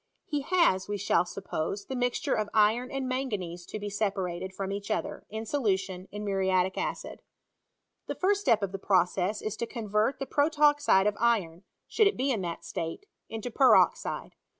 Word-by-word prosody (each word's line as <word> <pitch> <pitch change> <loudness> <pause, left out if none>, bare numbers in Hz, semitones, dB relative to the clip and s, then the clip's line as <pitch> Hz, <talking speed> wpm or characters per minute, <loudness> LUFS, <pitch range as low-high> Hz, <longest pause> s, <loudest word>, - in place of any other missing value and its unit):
He 295 -2 -2
has 275 - +2
(we 205 0 -2
shall 200 -3 +2
suppose) 195 +1 -4
the 265 - -5
mixture 245 -1 0
of 215 -1 -1
iron 220 +4 +3
and 270 -1 -3
manganese 205 -10 -3
to - - -5
be 205 -1 -5
separated 190 -3 -2
from 195 0 -4
each 200 +1 -5
other^ 215 - -3
in 220 +1 -5
solution, 190 -8 -1
in 210 +1 -5
muriatic 190 -2 +1
acid. - - -4 0.9
The - - -3
first 400 +2 +1
step 230 - +3
of 195 - -1
the 195 - -5
process 190 +1 +1
is 215 0 -3
to 235 - -3
convert 220 +1 0
the 270 - -4
protoxide 290 -8 +3
of 210 -1 +1
iron 200 -7 +1 0.2
(should 430 - +4
it 405 - 0
be 270 +2 +1
in 220 -6 -1
that 170 -2 -5
state) 165 - -5 0.2
into 225 +2 -5
peroxide. 285 - +3
210 Hz, 175 wpm, -29 LUFS, 190-255 Hz, 0.9 s, should